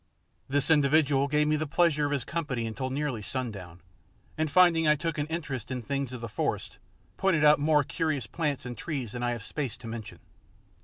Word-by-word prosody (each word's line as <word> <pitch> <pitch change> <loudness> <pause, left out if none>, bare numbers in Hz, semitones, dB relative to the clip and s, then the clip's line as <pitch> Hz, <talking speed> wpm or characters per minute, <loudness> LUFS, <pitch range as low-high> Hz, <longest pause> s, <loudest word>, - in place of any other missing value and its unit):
This 145 +2 +2
individual 145 -2 +4
gave 150 +1 +2
me 155 0 +2
the 155 0 -2
pleasure 150 -1 +2
of - - -4
his 140 -4 0
company 145 -9 -2
until 125 +4 -3
nearly 135 -4 -2
sundown, 100 -8 -5 0.5
and 155 0 -1
finding 165 -1 +5
I 150 - +5
took 160 +1 -3
an 145 - -1
interest 150 -7 -4
in 125 -2 -4
things 140 +2 -2
of 125 -2 -7
the 115 - -4
forest, 105 - -3 0.4
pointed 185 -6 +2
out 150 0 +6
more 150 0 +3
curious 155 -2 -1
plants 150 -6 -2
and 120 0 -5
trees 130 -3 -4
than 120 - -5
I 120 - +1
have 120 -3 -3
space 135 -1 -3
to - - -13
mention. 115 -1 -7
140 Hz, 200 wpm, -28 LUFS, 125-155 Hz, 0.5 s, out